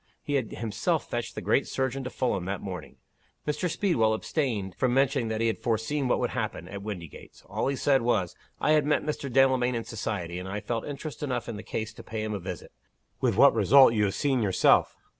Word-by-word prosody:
He 150 -2 -3
had 130 -6 0
himself 115 +9 -1
fetched 120 -1 -4
the 105 - -5
great 110 +6 +2
surgeon 130 0 -2
to - - -3
Fulham, 110 -9 -1
that 100 0 -3
morning. 95 -3 -7 0.5
Mr. 150 +5 0
Speedwell 115 - +2
abstained 110 - -2
from 125 +6 0
mentioning 135 -2 +2
that 110 0 -2
he - - +2
had 115 - 0
foreseen 120 +5 0
what - - +2
would - - -1
happen, 85 - -3
at 100 +1 -7
Windygates. 95 -7 -8
All - - -2
he 140 - 0
said 135 0 +3
was, 110 -7 0 0.2
'I - - +2
had 155 -2 +4
met 150 - +2
Mr. 145 -3 -3
Delamayn 130 -1 +3
in 115 - -2
society, 100 -7 -4
and 95 +1 -6
I 100 +2 -3
felt 115 +2 -3
interest 145 0 -6
enough 125 -5 -2
in 115 - -4
the 105 - -6
case 110 0 -4
to - - -11
pay 110 -1 -4
him 110 0 -3
a 100 - -3
visit 90 -1 -7 0.5
with - - +1
what - - +7
result, 135 -2 +6
you 105 -2 +2
have 95 - -1
seen 135 -4 +1
yourself. 95 -4 +3
115 Hz, 220 wpm, -27 LUFS, 105-135 Hz, 0.5 s, what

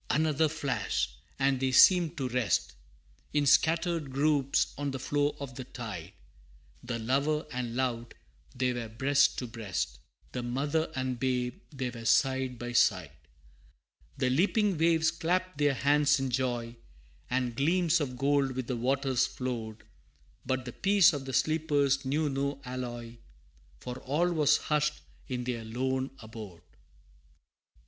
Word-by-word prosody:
Another 155 0 +2
flash! 145 - -1 0.3
and 135 -1 +2
they 130 0 0
seemed 170 +4 +6
to 135 -3 -1
rest, 100 - 0 0.6
In 145 -1 +2
scattered 160 +2 +2
groups, 140 0 +1
on 145 0 -3
the 135 - -3
floor 145 +2 0
of 140 -2 -6
the 130 +1 -6
tide: 105 -9 -7 0.7
The 120 -1 -3
lover 140 +7 0
and 120 -2 -4
loved, 120 -2 -2 0.4
they 125 0 0
were 120 -2 -5
breast 135 +5 +2
to 125 - -3
breast, 105 - -4 0.3
The 125 - -3
mother 145 +7 -1
and 130 -2 -2
babe, 125 +5 -1
they 130 -4 -3
were 115 -1 -9
side 130 0 +2
by 120 +1 -5
side. 90 -10 +2 1.1
The 130 -2 +1
leaping 200 - +2
waves 160 -1 +3
clapped 180 0 -1
their 145 -2 +3
hands 145 +1 +3
in 135 -1 -2
joy, 120 -2 -2 0.5
And 125 -2 -1
gleams 170 +4 +2
of 130 -3 -3
gold 140 0 +2
with 130 -1 -3
the 125 0 -3
waters 135 +1 +1
flowed, 115 -4 -5 0.6
But 130 -1 -2
the 125 - -6
peace 195 -3 +4
of 140 -2 -4
the 130 - -6
sleepers 145 -3 +1
knew 150 +4 0
no 140 0 -2
alloy, 120 -2 -6 0.6
For 125 +1 -6
all 165 +7 0
was 150 -4 +4
hushed 150 0 0 0.3
in 125 -3 -3
their 120 -2 -3
lone 130 +4 -2
abode! 110 -6 -10
V. - - -30
130 Hz, 145 wpm, -30 LUFS, 125-150 Hz, 1.1 s, seemed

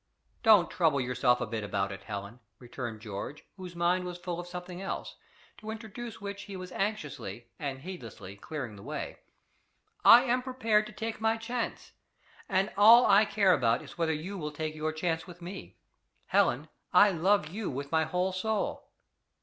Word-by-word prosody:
"Don't 215 -7 +6
trouble 160 -5 +2
yourself 125 -1 +2
a - - 0
bit 110 -1 -4
about 100 -1 -1
it, 100 -1 -7
Helen," 100 +2 -6 0.2
returned 120 -2 -7
George, 110 +7 -6
whose 180 -2 -9
mind 175 +2 +2
was 180 -1 -5
full 175 -1 -4
of 175 - -6
something 180 0 -7
else, 195 - -5 0.4
to 215 - -9
introduce 225 +1 -7
which 200 0 -6
he 200 -2 -7
was 185 0 -8
anxiously, 140 - -4
and 140 -2 -3
heedlessly, 115 - -8
clearing 125 0 -6
the - - -11
way: - - -5 0.8
"I 235 +1 +9
am 250 0 +1
prepared 230 -5 +1
to - - -10
take 225 0 -5
my 225 0 +2
chance, 235 +1 -4 0.6
and 195 +2 +1
all 225 +4 +8
I 200 +2 +6
care 200 -3 +3
about 115 -6 +2
is - - -13
whether 165 -1 +2
you 175 +6 -4
will 150 -2 -4
take 155 +1 -4
your 155 0 -2
chance 160 +1 -2
with 175 -1 -11
me. 180 +3 -9 0.5
Helen, - - +2 0.2
I 205 0 +7
love 180 -1 +2
you 205 +4 -4
with 140 +2 -5
my 160 -1 +3
whole 180 +2 0
soul." 210 +3 -2
175 Hz, 175 wpm, -30 LUFS, 140-205 Hz, 0.8 s, I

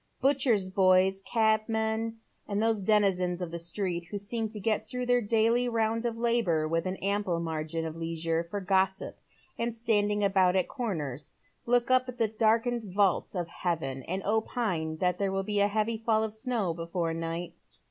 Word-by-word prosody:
Butchers' 255 -8 +2
boys, 190 0 +4
cabmen, 220 0 0 0.3
and 200 0 -1
those 220 -1 +1
denizens 190 -3 +2
of 175 -2 -4
the 170 - -4
street 175 0 -2
who 205 +5 -5
seem 220 +2 -2
to 210 0 -5
get 215 +1 0
through 250 +1 -3
their 245 0 +3
daily 230 +3 +2
round 230 0 0
of 230 -1 -4
labour 230 -10 +1
with 165 +2 -1
an 185 - -2
ample 200 -3 -1
margin 160 0 -3
of 160 -1 -5
leisure 165 0 -2
for 175 +5 -5
gossip 190 0 0 0.4
and 230 0 -1
standing 210 -2 +1
about 190 -2 +3
at 185 - +2
corners, 150 - -4 0.4
look 245 +1 +2
up 255 0 +3
at 250 - -7
the 230 -2 +2
darkened 225 0 +1
vault 195 0 +1
of 175 -2 -2
heaven 160 -7 -3
and 185 +2 -3
opine 205 -7 -1
that 180 +1 0
there 200 -1 0
will 195 0 -1
be 205 +1 -1
a 200 - +4
heavy 215 +2 -1
fall 220 -1 +2
of 220 -1 -3
snow 220 -6 -1
before 165 0 -2
night. 165 +1 -4
200 Hz, 180 wpm, -29 LUFS, 175-225 Hz, 0.4 s, boys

